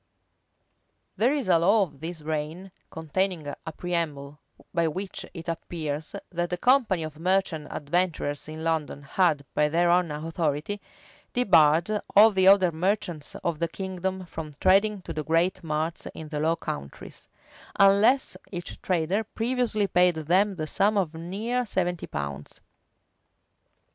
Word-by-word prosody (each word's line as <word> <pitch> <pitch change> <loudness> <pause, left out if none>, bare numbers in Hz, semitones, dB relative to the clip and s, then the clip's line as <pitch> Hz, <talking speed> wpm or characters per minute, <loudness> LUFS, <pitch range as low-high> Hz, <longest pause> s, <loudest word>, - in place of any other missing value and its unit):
[] - - -47
There 240 +4 +3
is 285 -6 -1
a 175 -3 +5
law 200 +5 +4
of 145 -7 -8
this 160 0 -6
reign,[] 155 +5 -4 0.2
containing 170 +1 -2
a 145 +3 -6
preamble, 150 -4 -3 0.3
by 170 -1 +2
which 185 +5 -5
it 165 0 -8
appears, 160 -2 -4 0.2
that 175 -1 -2
the 180 - -2
company 235 -6 +3
of 155 -1 -7
merchant 180 -3 0
adventurers 155 -2 -2
in 155 +1 -7
London 160 -3 -1
had, 150 -1 +1
by 150 0 +2
their 170 +2 +3
own 175 -1 +3
authority, 155 +4 -2 0.5
debarred 185 -3 +4
all 215 +2 +8
the 190 -2 +3
other 190 -2 +6
merchants 175 -2 -2
of 165 -3 -1
the 170 - +1
kingdom 190 +1 -4
from 155 -3 -8
trading 195 +1 +3
to - - -6
the 155 - -3
great 175 +4 +1
marts 160 +1 -2
in 155 -1 -8
the 150 -1 -3
Low 160 +2 +2
Countries, 70 - -8 0.5
unless 200 +7 +5 0.2
each 175 -3 -7
trader 185 +4 0
previously 225 -1 -1
paid 180 -2 +3
them 185 +6 +2
the 155 -3 -3
sum 200 +7 +1
of 175 -5 0
near 205 +10 -2
seventy 180 -5 -2
pounds. 70 0 -6
175 Hz, 145 wpm, -26 LUFS, 155-195 Hz, 0.5 s, all